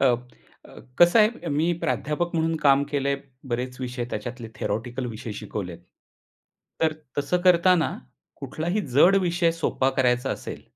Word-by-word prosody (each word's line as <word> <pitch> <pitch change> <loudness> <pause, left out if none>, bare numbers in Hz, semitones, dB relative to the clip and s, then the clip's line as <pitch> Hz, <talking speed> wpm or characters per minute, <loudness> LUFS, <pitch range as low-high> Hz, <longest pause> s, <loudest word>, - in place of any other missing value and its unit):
अ, - - +3
अ, 125 -1 -3 0.2
कसं 175 +6 +6
आहे. 220 +2 +2
मी 155 +4 +1
प्राध्यापक 170 +4 -1
म्हणून 165 0 +1
काम 140 -1 +5
केलंय 140 -1 0 0.3
बरेच 125 +2 -3
विषय 125 -1 -3
त्याच्यातले 120 +2 -5
थिअरेटिकल 120 +4 -3
विषय 115 0 -6
शिकवलेत. 95 -4 -6 1.0
तर 160 -1 +3 0.3
तसं 145 +5 0
करतांना 180 -1 +4 0.4
कुठलाही 175 +7 -2
जड 180 +8 +6
विषय 175 -1 +2
सोपा 145 -5 0
करायचा 125 0 +2
असेल - - -6
140 Hz, 135 wpm, -25 LUFS, 125-170 Hz, 1.0 s, कसं